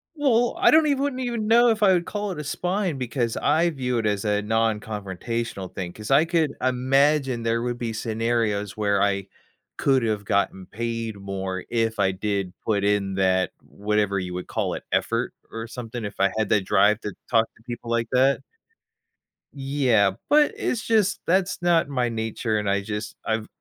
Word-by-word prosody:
Well, 245 -5 +2
I 370 - +6
don't 315 -1 +5
even 280 -2 +1
wouldn't 270 -2 -2
even 235 -4 -2
know 235 +2 +6
if 220 -1 +1
I 195 -2 +6
would 175 -1 +1
call 205 -1 -3
it 170 - -6
a - - -4
spine, 180 +1 -1
because 120 -2 -2
I 160 +4 +2
view 125 -6 -2
it 115 - -1
as 105 -1 0
a 105 0 +1
nonconfrontational 110 -1 -2
thing. 90 -2 -5
'Cause 105 +4 -7
I 145 +4 +6
could 165 -3 +1
imagine 130 0 +2
there 115 0 0
would 120 0 -2
be 115 -2 -3
scenarios 110 -2 -1
where 100 -2 +1
I 100 -1 +1 0.5
could 135 -3 +2
have 105 -2 -1
gotten 100 -2 0
paid 115 -1 -4
more 95 -1 -4
if 115 -1 0
I 95 -1 +2
did 100 -1 -2
put 100 -2 +1
in 100 -1 +1
that, 95 -1 +2
whatever 105 -1 -1
you 90 -1 -5
would 90 0 -5
call - - -2
it, - - -6
effort, - - 0 0.2
or 115 0 -6
something, 120 0 -6
if 100 - -7
I 100 0 +3
had 110 - 0
that 100 -3 +2
drive 105 +3 +4
to 105 - -5 0.2
talk 115 -2 +4
to 115 - -23
people 120 0 -7
like 115 0 0
that? 130 +2 +3 1.1
Yeah, 135 -8 +2 0.2
but 295 0 +5
it's 235 - -1
just 210 -3 +2
that's 185 0 +1
not 170 -4 +3
my 125 -3 0
nature, 110 -1 -2
and 105 -1 -1
I 100 0 +1
just 105 +1 -5
I've 110 -1 -1
115 Hz, 190 wpm, -24 LUFS, 105-145 Hz, 1.1 s, I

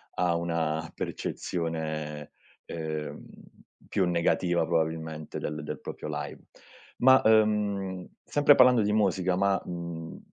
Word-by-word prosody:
ha 90 -2 +1
una 80 -2 -1
percezione, 80 -3 -4 0.3
ehm, 80 -2 -5 0.6
più 95 - +1
negativa 85 0 +1
probabilmente 80 -1 -2
del 75 -1 -4
del - - -5
proprio - - -7
live. - - -5 0.6
Ma, 130 +1 +6
ehm, 105 -4 +2 0.2
sempre 145 -1 +5
parlando 125 -2 +6
di 105 - +1
musica 95 -3 +2
ma, 100 0 +2
mhmm, 85 -2 -6
85 Hz, 110 wpm, -28 LUFS, 80-100 Hz, 0.6 s, Ma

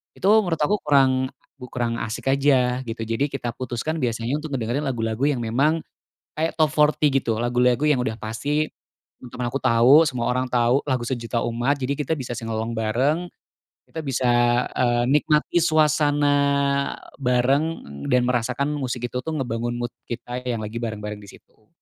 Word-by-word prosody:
Itu 195 - 0 0.2
menurut 165 -3 -2
aku 205 +8 +2
kurang, 130 -2 +3 0.2
kurang 120 -2 -3
asik 115 +4 -3
aja 130 -3 +2
gitu. 115 -1 -5
Jadi 115 +6 -1
kita 125 -3 -3
putuskan 130 +6 -3
biasanya 120 +2 -1
untuk 155 -2 -7
ngedengerin 125 +5 -2
lagu-lagu 115 0 -1
yang 135 -5 0
memang 145 +8 +1 0.6
kayak 160 +1 0
top 155 -2 +4
40 150 0 +3
gitu, 120 -5 0
lagu-lagu 125 +2 +2
yang 145 -4 +3
udah 110 - -2
pasti 145 +8 -1 0.5
teman-teman 125 -1 -5
aku 135 - -2
tahu, 120 +2 +5
semua 120 -2 -2
orang 130 +1 0
tahu, 120 +2 +3
lagu 130 -3 0
sejuta 120 -1 -2
umat 120 +4 0
jadi 135 +2 -1
kita 150 +2 -2
bisa 125 -2 -5
sing-along 115 0 -3
bareng. 130 +10 0 0.6
Kita 160 - -7
bisa, 130 -3 -1 0.5
eee, 120 -1 +2
nikmati 150 +3 +2
suasana 150 -2 +3 0.9
bareng 125 +4 +2 0.5
dan 125 -1 +3
merasakan 125 +4 0
musik 125 -3 -3
itu 125 - -3
tuh 160 - -4
ngebangun 120 -2 -2
mood 120 0 -4 0.2
kita 125 +1 -5
yang 120 -2 -1
lagi 110 +2 -5
bareng-bareng 105 -2 -5
di 100 - -13
situ. 110 - -21
125 Hz, 160 wpm, -23 LUFS, 120-145 Hz, 0.9 s, tahu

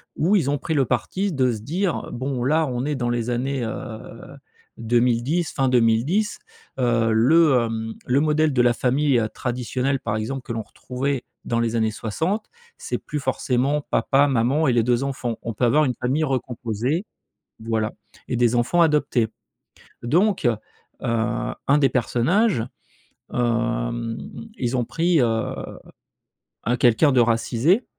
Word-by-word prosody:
où 185 +7 +2
ils 140 -8 +2
ont 145 - -1
pris 160 - -2
le 135 -3 +3
parti 185 - -1
de 130 -2 +2
se 110 -3 -5
dire: 175 - -2
«Bon, 130 0 -3
là, 155 +4 +2
on 125 0 -2
est 150 - -1
dans 120 -4 -1
les 120 0 -1
années, 130 +1 -1
heu, 115 +3 -8 0.4
2010, 120 +8 +1
fin 135 -2 +1
2010, 125 - +2 0.4
heu, 120 -2 +2
le, 130 +3 +5
hem, 115 0 -4
le 130 +3 +2
modèle 155 0 +2
de 125 - +3
la 120 0 +4
famille, 130 +3 +2
heu, 110 - 0
traditionnelle, 125 +3 -2
par 110 -4 -2
exemple, 125 +5 -4
que 115 - -5
l'on 115 - -2
retrouvait 130 +4 -4 0.2
dans 115 - 0
les 115 0 0
années 110 -1 +2
60, 160 - -2 0.3
c'est - - -4
plus 150 - -5
forcément 135 +2 0
papa, 140 +1 +3
maman 135 +5 +2
et - - +4
les 115 -2 +3
2 120 +2 +1
enfants. 125 -4 -3
On 115 - -4
peut 125 - +1
avoir 150 +6 +4
une 125 - -1
famille 135 +6 0
recomposée 130 - -2 0.6
voilà, 110 -1 -1 0.4
et 125 - -1
des 120 0 +2
enfants 120 +9 +3
adoptés», 150 -7 +2 0.8
donc 180 - +2
heu, 120 -2 +3 1.1
un 140 +2 +5
des 135 -2 +4
personnages, 125 - +1 0.7
hem, 120 -1 -1 0.4
ils 120 +1 -1
ont 120 - +1
pris, 165 +4 +1
heu, 125 - +4 1.4
un 120 - +2
quelqu'un 125 +5 +4
de 125 - +5
racisé 120 - +2
125 Hz, 155 wpm, -23 LUFS, 115-145 Hz, 1.4 s, le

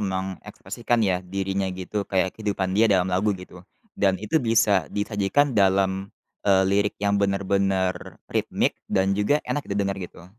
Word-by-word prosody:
mengekspresikan 95 +4 -3
ya, 90 -2 +1
dirinya 95 +1 -2
gitu, 100 +2 -4
kayak 95 -1 +1
kehidupan 100 -3 -2
dia 115 - +5
dalam 95 -1 +2
lagu, 100 +4 +1
gitu. 90 -1 -12 0.3
Dan 95 -2 +1
itu 110 - 0
bisa 110 - +2
disajikan 105 +7 0
dalam, 95 -1 +2 0.4
eee, 95 -1 +5
lirik 100 +1 +1
yang 100 0 0
benar-benar 95 -2 0 0.2
ritmik - - 0 0.2
dan 95 +1 +2
juga 105 +10 +1
enak 145 - -2
didengar, 100 -1 -1
gitu. 90 -1 -9
100 Hz, 145 wpm, -24 LUFS, 95-105 Hz, 0.4 s, dia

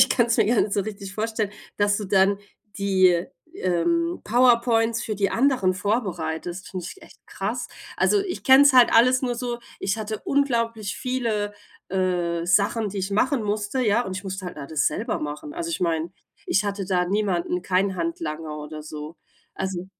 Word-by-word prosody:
ich 260 0 +6
kann's 235 -3 +3
mir 220 - +3
gar 235 +1 +3
nicht 205 - 0
so 200 - +2
richtig 200 -2 -7
vorstellen, 220 -1 -2 0.3
dass 205 0 +2
du 210 - -4
dann 195 +1 +3 0.4
die, 185 -3 +3 0.3
ähm, 335 - 0
PowerPoints 235 -1 +3
für 215 - -3
die 195 -1 0
anderen 245 -8 +2
vorbereitest, 180 -3 -2
finde 180 -3 -5
ich - - -11
echt - - -16
krass. - - -3 0.3
Also 415 - +4
ich 385 -2 -5
kenne 265 +1 +8
es 285 - +6
halt 250 -2 +7
alles 255 +3 +5
nur 245 -2 0
so, 240 0 -3 0.2
ich 195 +2 -1
hatte 215 0 -4
unglaublich 230 -7 0
viele, 230 -5 -1 0.4
äh, 175 -3 -1
Sachen, 205 +4 +2
die 200 - -8
ich 190 +1 -2
machen 245 +4 +1
musste, 210 +4 -1
ja, 210 +2 +3
und 185 - -4
ich 185 - -7
musste 190 -1 -5
halt 180 - -7
da 140 - -7
das 155 -1 0
selber 220 - -1
machen. 150 - -6
Also, 335 -1 -4
ich - - -3
meine, 165 -1 0 0.4
ich 195 - +2
hatte 200 -1 -2
da 180 -2 +1
niemanden, 180 -2 0
kein 190 +1 +1
Handlanger 165 - -4
oder 150 +1 -7
so. 155 +1 -8 0.4
Also 185 -1 -4
205 Hz, 185 wpm, -24 LUFS, 185-235 Hz, 0.4 s, kenne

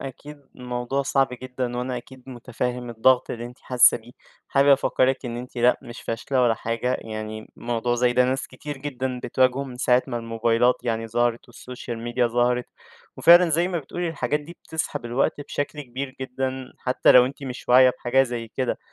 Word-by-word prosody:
أكيد 140 +1 -10
الموضوع 125 +2 -2
صعب 135 -1 +2
جدًا 125 -1 -4
وأنا 125 0 -2
أكيد 130 +1 -11
مُتفاهم 125 0 -4
الضغط 125 +3 +3
اللي 120 0 -5
أنتِ 125 +1 -13
حاسّة 125 -1 +5
بيه. 115 +2 -14 0.4
حابب 140 +1 +3
أفكَّرك 135 -1 +3
إن 120 0 -4
أنتِ 125 +1 -9
لأ، 120 +1 +3
مش 120 - -10
فاشلة 125 +3 -1
ولا 115 -2 +3
حاجة، 115 +3 -2
يعني 110 0 -7
موضوع 120 0 -1
زي 120 0 +2
ده 125 0 +4
ناس 130 +1 -1
كتير 145 +2 -8
جدًا 130 -3 -4
بتواجهه 130 +1 +2
من 125 -2 -9
ساعة 125 0 +3
ما 120 - -4
الموبايلات 115 +1 +2
يعني 115 -2 -2
ظهرت 120 +1 -1
والsocial 120 -1 -8
media 120 0 +1
ظهرت. 125 0 +1 0.5
وفعلًا 175 +1 +7
زي 170 +4 +2
ما 175 - -1
بتقولي 170 +4 -4
الحاجات 150 -2 -1
دي 170 +4 -12
بتسحب 160 -6 -4
الوقت 120 +4 0
بشكل 145 +1 -4
كبير 130 +1 -6
جدًا 130 0 -4
حتّى 125 - +3
لو 125 0 +7
أنتِ 140 +1 -8
مش 125 -2 -7
واعية 130 +1 +7
بحاجة 125 +2 +2
زي 120 -3 -4
كده، 130 +2 -2
125 Hz, 180 wpm, -24 LUFS, 120-135 Hz, 0.5 s, وفعلًا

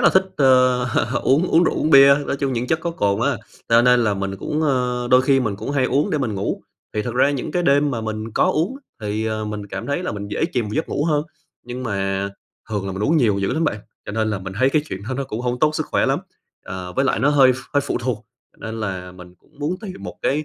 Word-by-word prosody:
là - - +6
thích, 190 - +5
ơ, 130 -2 +4 0.4
uống 150 +7 +3
uống 165 - +4
rượu, - - +1
uống 155 - 0
bia, 140 0 +8
nói - - -1
chung 135 -1 -1
những 120 +1 -2
chất 160 +4 0
có 170 - -2
cồn 100 -8 0
á, 140 +2 +1 0.3
cho 115 +1 +5
nên 125 -1 +4
là 105 -2 +1
mình 100 0 -3
cũng 150 +9 -2
ơ, 125 -4 0
đôi 125 0 +6
khi 135 0 +3
mình 105 -5 -1
cũng 135 - -5
hay 140 -3 +1
uống 140 +4 +1
để 150 - +1
mình 115 -6 -1
ngủ. 95 - -3 0.3
Thì 105 - 0
thật 120 -1 -4
ra 140 +3 +4
những 140 -3 -3
cái 175 -1 +1
đêm 145 -1 +3
mà 115 - -2
mình 110 0 -4
có - - +3
uống, 180 - -1 0.2
thì, 110 +1 -2
ờ, 110 0 -2
mình 105 -1 -5
cảm 100 +3 -6
thấy 145 +6 -1
là - - -3
mình 100 0 -6
dễ - - -1
chìm 120 -3 0
vào 105 - -6
giấc 160 - -1
ngủ 145 - -1
hơn. 150 -3 +2 0.4
Nhưng 125 +1 -6
mà 95 -3 -1 0.4
thường 100 -2 -2
là 95 - -3
mình 100 +2 -4
uống 160 +7 +3
nhiều 110 -9 +3
dữ 100 +4 0
lắm 160 +3 0
bạn, 110 - 0 0.3
cho 100 - -5
nên 110 0 0
là 105 - -1
mình 95 0 -7
thấy 130 +1 +4
cái 150 0 +2
chuyện 95 - -5
đó 130 - -2
nó 135 +1 -2
cũng 115 -1 -5
hông 125 0 -2
tốt 155 0 +2
sức - - -2
khỏe - - +1
lắm. - - +2 0.5
Ờ, 90 -1 -6
với 135 - +1
lại - - +1
nó 135 - +2
hơi 135 -3 +6
ph - - -6 0.2
hơi 145 - +4
phụ 140 - -2
thuộc, 120 -3 -3 0.3
cho - - -30
nên 110 0 -5
là 90 -3 -4
mình 90 -1 -13
cũng 145 - -29
muốn 155 +5 -1
tìm 190 -4 -8
một - - -7
cái 150 +3 +1
125 Hz, 280 wpm, -21 LUFS, 105-140 Hz, 0.5 s, bia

